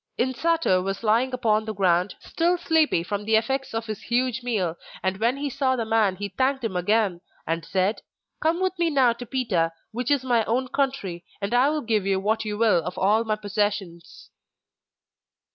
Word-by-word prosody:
Insato 260 - +1
was 195 +3 -4
lying 230 +4 +2
upon 220 -4 +1
the 215 -1 -4
ground, 185 0 +2
still 345 +2 0
sleepy 320 - +2
from 205 +3 -3
the 220 +1 +2
effects 265 +5 0
of 225 0 -3
his 215 -2 -5
huge 250 +1 0
meal, 205 -9 -1 0.3
and 190 0 0
when 235 +4 +1
he 290 +1 -2
saw 265 -1 0
the 230 -3 -2
man 220 -4 +2
he 200 +2 -5
thanked 260 +6 0
him 215 -5 -2
again, 190 -1 +1 0.2
and 165 +1 -2
said: 190 +5 0 0.4
'Come 325 +2 +1
with 375 -1 +1
me 340 -1 +2
now 265 -5 +4
to 240 +1 -9
Pita, 200 -10 0 0.2
which 245 +2 -3
is 285 -3 +2
my 240 -3 +2
own 255 +3 0
country, 260 -11 -2 0.2
and 200 +3 -3
I 250 +3 +4
will 305 0 -1
give 215 -4 0
you 195 -1 +2
what 220 +3 0
you 210 -1 -3
will 210 -7 +3
of 180 +3 -6
all 210 +4 +3
my 215 -1 0
possessions. 205 -4 -3
225 Hz, 195 wpm, -25 LUFS, 195-260 Hz, 0.4 s, now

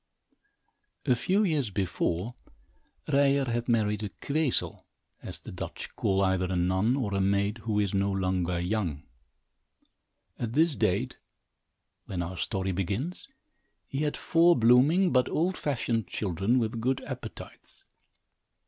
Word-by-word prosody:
A - - +4
few 190 - +1
years 150 - +1
before, 95 +2 -1 0.7
Ryer 140 0 +3
had 120 0 -2
married 105 -3 +1
a 105 - -3
"queezel," 140 - -1 0.4
as - - -7
the - - -11
Dutch - - -7
call 95 0 +1
either 95 -1 +1
a - - 0
nun, 95 +7 +2
or 115 -8 -2
a 100 - +1
maid 100 +3 +1
who 110 -1 -1
is 100 -2 0
no 100 0 +1
longer 90 -2 0
young. 90 -5 -2 1.4
At 115 -1 -3
this 160 +1 +3
date, - - 0 0.9
when 90 -2 -2
our 90 +2 -6
story 95 0 -2
begins, 100 - -3 0.6
he 135 - -4
had 150 -1 -1
four 170 +1 +4
blooming, 135 +11 +5
but 125 -1 +3
old 180 +4 0
fashioned 115 - -1
children, 100 +6 0
with 115 -1 -1
good 130 +3 0
appetites. - - -9
110 Hz, 135 wpm, -28 LUFS, 95-135 Hz, 1.4 s, blooming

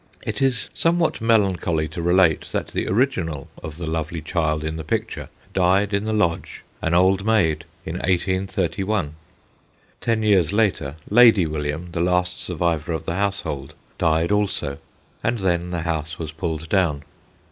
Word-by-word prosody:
It - - -3
is 130 -3 +1
somewhat 165 -4 +1
melancholy 95 -8 +2
to 85 +2 -5
relate 85 -1 +3
that - - -2
the - - -2
original 90 - 0
of 75 0 -7
the 85 - -5
lovely 80 +1 -2
child 75 -1 0
in 80 0 -3
the 80 - -5
picture 75 - -3 0.2
died 95 +3 +3
in 100 +1 0
the 110 - -1
Lodge, 85 -6 -1 0.2
an 80 +1 +1
old 95 +2 +4
maid, 85 -8 +2 0.2
in 85 - -4
1831. 95 -1 0 0.9
Ten 115 -2 +1
years 95 -6 +4
later, 100 -9 +1 0.2
Lady 110 -5 +7
William, 75 +2 -3
the 85 - -2
last 90 0 +1
survivor 85 -2 -1
of 80 - -4
the - - -2
household, 85 -8 -2 0.2
died 80 +3 +2
also, 100 -9 0 0.4
and 120 - +1
then 90 -3 0
the 85 -2 -2
house 80 0 -3
was 80 -2 -5
pulled 80 -1 -4
down. 80 -7 +1
85 Hz, 155 wpm, -23 LUFS, 80-100 Hz, 0.9 s, Lady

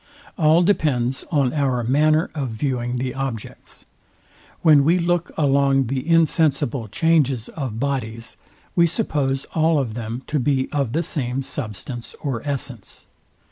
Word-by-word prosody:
All 160 0 +4
depends 135 -9 +1
on 140 -5 +1
our 135 -5 0
manner 155 +6 +2
of 140 -5 -3
viewing 120 +1 -2
the 125 0 -2
objects. 135 -5 -6 0.8
When 150 -4 +6
we 165 +5 +4
look 175 0 0
along 140 -2 +3
the 135 +5 -3
insensible 155 -7 +2
changes 135 -1 +1
of 130 -8 -5
bodies, 115 -4 -3 0.4
we 170 -1 +5
suppose 145 - -1
all 160 0 +3
of 130 -6 -1
them 115 +2 -5
to 150 - -1
be 130 0 0
of 140 -5 -1
the 165 - +1
same 135 -3 -2
substance 120 -2 -5
or 130 -6 -3
essence. 130 -6 -5
135 Hz, 140 wpm, -22 LUFS, 125-155 Hz, 0.8 s, When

